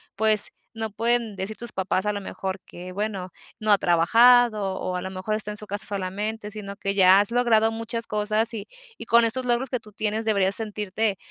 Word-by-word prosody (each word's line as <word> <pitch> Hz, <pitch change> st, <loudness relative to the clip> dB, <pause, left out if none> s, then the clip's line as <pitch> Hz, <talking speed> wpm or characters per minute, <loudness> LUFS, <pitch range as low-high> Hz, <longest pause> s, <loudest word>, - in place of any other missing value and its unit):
pues, 215 Hz, 0 st, +7 dB, 0.2 s
no 225 Hz, 0 st, -4 dB
pueden 230 Hz, 0 st, -1 dB
decir 195 Hz, +3 st, -5 dB
tus 235 Hz, -2 st, -9 dB
papás, 190 Hz, +1 st, -2 dB
a 210 Hz, -, 0 dB
lo 205 Hz, -, -4 dB
mejor, 190 Hz, 0 st, -6 dB
que: 180 Hz, +1 st, -10 dB
"Bueno, 195 Hz, -3 st, -4 dB, 0.3 s
no 215 Hz, -1 st, 0 dB
ha 205 Hz, -, +6 dB
trabajado 215 Hz, +4 st, +4 dB
o, 185 Hz, -1 st, -4 dB
a -, -, -4 dB
lo 190 Hz, -, -6 dB
mejor, 190 Hz, +3 st, -3 dB
está 210 Hz, -1 st, -4 dB
en 210 Hz, -, -6 dB
su 210 Hz, -, -7 dB
casa 205 Hz, +2 st, -4 dB
solamente", 205 Hz, +2 st, -4 dB
sino 200 Hz, -2 st, -8 dB
que 200 Hz, -1 st, -3 dB
ya 190 Hz, 0 st, +6 dB
has 205 Hz, +2 st, +1 dB
logrado 225 Hz, -2 st, +2 dB
muchas 230 Hz, +1 st, -4 dB
cosas 215 Hz, +2 st, +1 dB
y 210 Hz, -3 st, -7 dB, 0.3 s
y -, -, -9 dB
con 235 Hz, +1 st, +4 dB
esos 250 Hz, +3 st, 0 dB
logros 245 Hz, +1 st, 0 dB
que 250 Hz, -, -2 dB
tú 210 Hz, -, -17 dB
tienes 215 Hz, +1 st, -2 dB
deberías 200 Hz, -3 st, +2 dB
sentirte, 210 Hz, -1 st, -2 dB
210 Hz, 210 wpm, -24 LUFS, 195-225 Hz, 0.3 s, pues